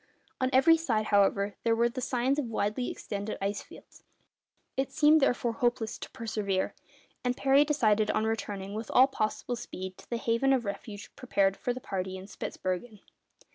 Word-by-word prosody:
On 255 - +1
every 275 +6 +6
side, 230 -10 0
however, 200 -1 +3
there 230 -1 +3
were 235 +1 +3
the 250 +2 -5
signs 255 +3 +1
of 290 - -1
widely 225 +1 -1
extended 205 0 -5
ice 200 +1 -2
fields. - - -16 0.7
It 270 0 -1
seemed, 310 0 +5
therefore, 245 -3 +2
hopeless 240 -1 -1
to - - -7
persevere, 205 -4 -2 0.5
and 250 0 0
Parry 275 +1 +5
decided 220 -8 +2
on 215 - +1
returning 205 -3 -3
with 220 +1 -5
all 255 - +7
possible 245 -1 -2
speed 190 -5 -7
to - - -16
the 235 - -1
haven 230 +4 +2
of 250 -4 +1
refuge 205 +1 -7
prepared 195 -6 +1
for 245 - -2
the 250 - -4
party 190 -4 -4
in 190 - -9
Spitzbergen. 200 +2 -5
225 Hz, 175 wpm, -29 LUFS, 200-255 Hz, 0.7 s, all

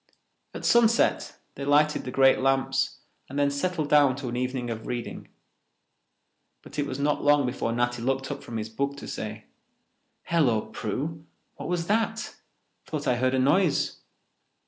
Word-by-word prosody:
At - - -6
sunset 235 0 +3 0.2
they 140 - -7
lighted 150 +2 +3
the 125 - -4
great 135 +1 +5
lamps 135 0 +1 0.3
and 140 - -6
then 145 0 +2
settled 155 +1 -1
down 145 -3 +5
to 135 -2 -5
an 120 - -4
evening 125 -1 -2
of 110 -1 -6
reading. 120 -1 -5 1.4
But - - -8
it 145 - 0
was 130 - -4
not 145 +1 0
long 145 -1 +4
before 125 -2 -2
Natty 120 0 0
looked 135 +2 -1
up 140 - -5
from 115 - -6
his 110 0 -3
book 140 +5 -3
to - - -8
say, - - -6 0.8
"Hello, 135 -10 +2
Prue, 140 +9 -4 0.3
what - - -6
was 175 -2 -1
that? 225 +3 0 0.5
Thought 150 -2 -4
I 125 - +2
heard 130 +1 +1
a - - +2
noise." 150 +6 +2
135 Hz, 165 wpm, -26 LUFS, 125-150 Hz, 1.4 s, great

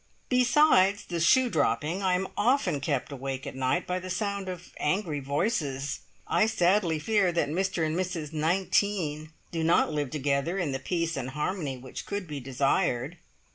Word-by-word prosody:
Besides 250 -6 +4
the 170 -1 -3
shoe 255 +10 +5
dropping, 160 -1 0
I 185 -2 +2
am 190 +1 -1
often 245 - +2
kept 140 - -1
awake 135 -1 -5
at - - -5
night 130 +7 0
by 180 0 -2
the 185 0 -8
sound 200 0 -2
of 180 -1 -8
angry 165 -2 -1
voices. 140 - -1 0.3
I 215 - +2
sadly 180 -5 +2
fear 200 +2 +2
that 170 - +1
Mr 180 0 0
and 155 +1 -1
Mrs 170 -4 -3
19 160 -1 0 0.2
do 165 -1 -2
not 160 -1 +3
live 145 -3 -1
together 145 +4 -1
in 175 -7 -1
the 135 - -2
peace 170 +3 -1
and 130 -1 -3
harmony 150 -1 -3
which 130 +1 -8
could 200 -1 -3
be 150 -2 -5
desired. 135 +3 0
170 Hz, 170 wpm, -28 LUFS, 145-190 Hz, 0.3 s, shoe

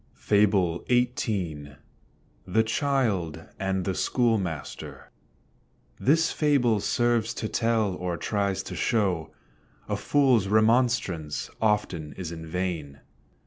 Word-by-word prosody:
FABLE 100 -5 +2
XVIII. 100 - -1 0.7
THE 110 +5 +3
CHILD 110 - 0 0.2
AND 95 -1 -1
THE 95 - 0
SCHOOLMASTER. 100 - -2 0.9
This 160 +4 +3
fable 130 -8 +2
serves 120 +1 +1
to 110 - -3
tell, 115 -3 +1
or 90 -1 -3
tries 100 -1 -1
to - - -7
show 95 -8 0 0.6
A - - -1
fools 130 -8 +3
remonstrance 110 -7 +1
often 100 -8 0
is 85 +2 -6
in 80 -1 -8
vain. 80 -5 -4
100 Hz, 100 wpm, -26 LUFS, 85-115 Hz, 0.9 s, THE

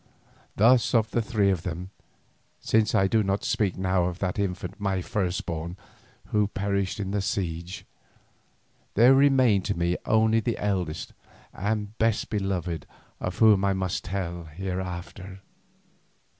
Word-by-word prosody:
Thus 120 +4 +4
of 110 -1 +2
the 120 - +1
three 105 -3 +1
of 90 -4 -1
them—since 95 +4 -3
I 95 - +4
do 110 +3 +2
not 100 0 -1
speak 100 -4 0
now 95 -1 +1
of 90 -1 -3
that 95 +1 -2
infant, 95 0 -3
my 95 -2 0
firstborn, 90 -2 -3 0.5
who 105 -1 +2
perished 100 -1 -2
in 100 -1 -3
the 100 0 0
siege—there 90 -2 -3 1.3
remained 130 -8 +4
to - - -1
me 85 +1 +1
only 110 0 +4
the 115 +1 -2
eldest 95 -6 -2 0.4
and 105 +1 -2
best 115 -1 +1
beloved 90 - -2 0.3
of 90 - -4
whom 105 -4 +5
I 100 0 +2
must 95 -1 -2
tell 90 -2 -4
hereafter. 95 +2 -6
95 Hz, 130 wpm, -26 LUFS, 90-105 Hz, 1.3 s, whom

